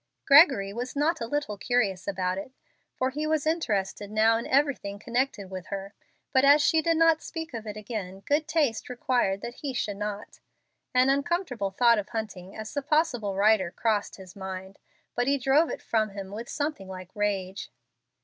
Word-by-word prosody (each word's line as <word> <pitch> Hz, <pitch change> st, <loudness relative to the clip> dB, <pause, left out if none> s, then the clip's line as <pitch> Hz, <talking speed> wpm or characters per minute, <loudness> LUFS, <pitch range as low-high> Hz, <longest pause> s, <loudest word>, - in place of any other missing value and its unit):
Gregory 275 Hz, -, +6 dB
was 245 Hz, +4 st, -5 dB
not 300 Hz, +1 st, +1 dB
a 230 Hz, -, -2 dB
little 265 Hz, -7 st, -2 dB
curious 205 Hz, -7 st, 0 dB
about 185 Hz, -1 st, -1 dB
it, 200 Hz, -, -8 dB, 0.4 s
for 260 Hz, 0 st, 0 dB
he 300 Hz, +3 st, -3 dB
was 310 Hz, -1 st, 0 dB
interested 210 Hz, -, -1 dB
now 220 Hz, +1 st, +4 dB
in 230 Hz, -, -3 dB
everything 260 Hz, -8 st, +1 dB
connected 235 Hz, -3 st, -2 dB
with 185 Hz, -1 st, -7 dB
her; 195 Hz, +1 st, -6 dB, 0.4 s
but 260 Hz, -, +4 dB
as 285 Hz, +2 st, +7 dB
she 320 Hz, +2 st, +3 dB
did 330 Hz, +1 st, +1 dB
not 330 Hz, -1 st, +4 dB
speak 325 Hz, -3 st, -6 dB
of 225 Hz, -1 st, -6 dB
it 210 Hz, 0 st, -5 dB
again, 200 Hz, -3 st, -6 dB
good 295 Hz, +7 st, 0 dB
taste 300 Hz, -9 st, 0 dB
required 240 Hz, -5 st, 0 dB
that 240 Hz, +1 st, -7 dB
he 275 Hz, -3 st, -3 dB
should 205 Hz, -4 st, -2 dB
not. 210 Hz, 0 st, -5 dB, 0.6 s
An 255 Hz, +1 st, +5 dB
uncomfortable 280 Hz, -, -1 dB
thought 235 Hz, +3 st, +4 dB
of 200 Hz, -, -5 dB
Hunting 210 Hz, -5 st, -6 dB
as 220 Hz, 0 st, -7 dB
the 285 Hz, -, -1 dB
possible 270 Hz, -, +1 dB
writer 200 Hz, -2 st, +4 dB
crossed 210 Hz, +2 st, -1 dB
his 190 Hz, 0 st, -13 dB
mind, 190 Hz, 0 st, -7 dB, 0.3 s
but 245 Hz, +1 st, 0 dB
he 280 Hz, 0 st, +3 dB
drove 275 Hz, +5 st, +3 dB
it -, -, -6 dB
from 220 Hz, -2 st, +1 dB
him 195 Hz, -1 st, -8 dB
with 225 Hz, +3 st, -7 dB
something 290 Hz, -10 st, -3 dB
like 185 Hz, -1 st, -9 dB
rage. 195 Hz, -, -2 dB
225 Hz, 185 wpm, -27 LUFS, 200-280 Hz, 0.6 s, as